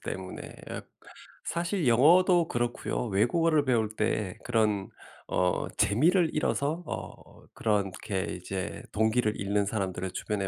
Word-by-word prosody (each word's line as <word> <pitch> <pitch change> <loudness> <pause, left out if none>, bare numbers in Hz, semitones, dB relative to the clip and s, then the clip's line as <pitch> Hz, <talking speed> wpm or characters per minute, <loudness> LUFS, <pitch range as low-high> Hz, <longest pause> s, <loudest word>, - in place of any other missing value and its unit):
때문에. 95 -1 -6 0.9
사실 170 -2 -1
영어도 170 +8 +5
그렇고요 120 0 -2
외국어를 155 - +2
배울 115 -4 +2
때 105 -3 -1
그런 110 -5 +1 0.4
어 90 -1 +1
재미를 165 - +3
잃어서 155 +2 0
어 - - -8
그렇게 100 -2 -1
이제 95 0 -5
동기를 110 0 +1
잃는 100 +1 +1
사람들을 95 -3 -2
주변에 100 0 -2
110 Hz, 265 characters per minute, -28 LUFS, 100-155 Hz, 0.9 s, 영어도